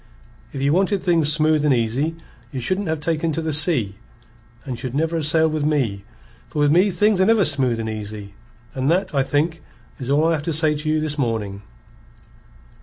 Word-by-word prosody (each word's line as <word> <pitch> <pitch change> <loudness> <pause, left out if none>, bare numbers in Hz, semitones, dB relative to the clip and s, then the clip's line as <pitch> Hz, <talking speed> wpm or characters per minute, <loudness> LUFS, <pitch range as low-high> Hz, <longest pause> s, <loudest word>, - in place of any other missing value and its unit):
If - - -6
ye 140 - +2
wanted 195 +3 +1
things 165 -4 +3
smooth 155 0 +2
and 150 - +2
easy, 125 +8 -1 0.4
ye 135 - -5
shouldn't 185 +11 -2
have 160 -1 -2
taken 160 +1 -1
to 165 - -2
the 160 -1 -1
sea, 145 - +4 0.7
and 130 -3 -4
ye - - -12
should 130 0 -5
never 165 +2 0
ha' - - -2
sailed 160 +1 +1
with 155 -2 -2
me, 125 -10 -1 0.4
for - - -10
with 145 -1 +3
me 180 +6 +4
things 205 0 +2
are - - +4
never 220 -4 +4
smooth 130 -6 +1
and 110 - -4
easy. 105 -2 -7 0.4
And 130 +1 -1
that, 185 +1 0
I 140 - +2
think, 155 +4 -1 0.4
is 130 -1 -6
all 145 +3 +2
I 165 - +2
have 160 -3 -1
to - - 0
say 155 0 +3
to 150 +1 -4
you 155 0 +1
this 150 -1 -1
morning." 110 -6 -3
150 Hz, 210 wpm, -21 LUFS, 130-165 Hz, 0.7 s, sea